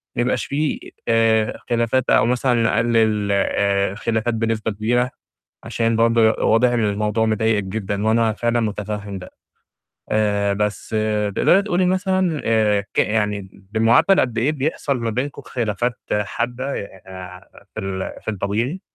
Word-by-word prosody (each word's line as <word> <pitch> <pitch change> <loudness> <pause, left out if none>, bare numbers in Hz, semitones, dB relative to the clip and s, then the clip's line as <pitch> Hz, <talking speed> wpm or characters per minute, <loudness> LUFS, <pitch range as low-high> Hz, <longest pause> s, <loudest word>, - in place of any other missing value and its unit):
ما - - 0
يبقاش 125 - 0
في 150 +2 -2 0.2
آآ، 115 -1 +2
خلافات 120 +2 +1
أو - - +5
مثلًا 125 +1 +1
نقلِّل 110 -2 +2
آآ 100 0 +1
الخلافات 115 +3 -1
بنسبة 115 -1 -1
كبيرة، 120 +5 0 0.5
عشان 115 -1 0
برضه 115 0 +3
واضح 115 +3 +2
إن 120 -2 0
الموضوع 105 +2 0
مضايقكِ 110 -1 +1
جدًا 100 +1 -3
وأنا 115 0 +2
فعلًا 120 +2 0
مُتفهم 105 -2 -4
ده. 90 - -10 0.8
آآ، 105 -1 +1
بس 105 +2 -3
آآ 105 -1 0
تقدري 180 - +3
تقولي 185 -3 +1
مثلًا 185 -3 +1
آآ 105 -3 +2
ك - - -5
يعني 105 -2 0 0.2
بمعدل 115 - +4
قد 120 -3 -1
إيه 130 +7 +2
بيحصل 145 -1 -1
ما 115 -1 -2
بينكم 140 +5 -3
خلافات 120 0 -2
حادة، 120 +6 -2 0.3
آآ 95 0 -11
في - - -4
ال 95 0 -4
في - - -3
الطبيعي؟ 110 - -2
110 Hz, 145 wpm, -21 LUFS, 105-120 Hz, 0.8 s, أو